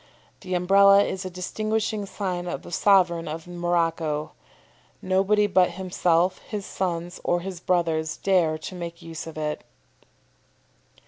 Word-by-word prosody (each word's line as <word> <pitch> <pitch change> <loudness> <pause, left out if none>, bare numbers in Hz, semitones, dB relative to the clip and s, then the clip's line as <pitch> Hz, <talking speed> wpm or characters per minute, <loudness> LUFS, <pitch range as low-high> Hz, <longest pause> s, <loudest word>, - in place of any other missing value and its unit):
The 185 -2 -4
Umbrella 200 +2 +6
is 190 -1 -4
a - - -3
distinguishing 215 +3 -2
sign 180 -3 -3
of - - -4
the - - -11
sovereign 175 -3 +3
of 160 +1 -5
Morocco. 165 -3 -1 0.7
Nobody 195 +3 +2
but 185 -3 +3
himself, 180 -1 +1
his 205 -2 -6
sons, 175 -2 -3
or 175 0 +1
his 185 -1 -6
brothers 165 -3 0
dare 175 -5 +2
to 155 - -8
make 170 -1 -7
use 165 -1 -7
of 160 - -9
it." 150 -1 -3
180 Hz, 135 wpm, -25 LUFS, 165-190 Hz, 0.7 s, Umbrella